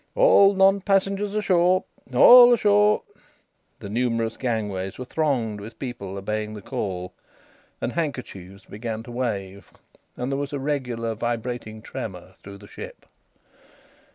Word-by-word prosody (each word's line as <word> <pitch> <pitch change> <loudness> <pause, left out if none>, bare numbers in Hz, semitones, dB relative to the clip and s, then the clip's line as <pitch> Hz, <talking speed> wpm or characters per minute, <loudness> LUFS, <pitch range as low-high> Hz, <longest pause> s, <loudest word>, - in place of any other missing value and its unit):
"All - - +5
non 195 +1 +4
passengers 195 +1 0
ashore! 185 -2 +2 0.3
All 245 0 +9
ashore!" 210 -2 +3 0.8
The - - -7
numerous 115 0 -1
gangways 105 -6 -3
were 125 - -6
thronged 125 -9 -1
with 110 +2 -10
people 100 -7 -6
obeying 105 +2 -4
the 105 - -8
call, 90 -2 -4 0.7
and - - -3
handkerchiefs 110 - -5
began 110 +1 -6
to 120 - -11
wave. 100 -6 -4 0.5
And 125 +2 -3
there 135 - -1
was 145 0 -4
a 140 - -2
regular 125 -5 -2
vibrating 115 -1 -4
tremor 95 -8 -7
through 100 0 -11
the 100 0 -15
ship. - - -10
120 Hz, 130 wpm, -24 LUFS, 105-170 Hz, 0.8 s, All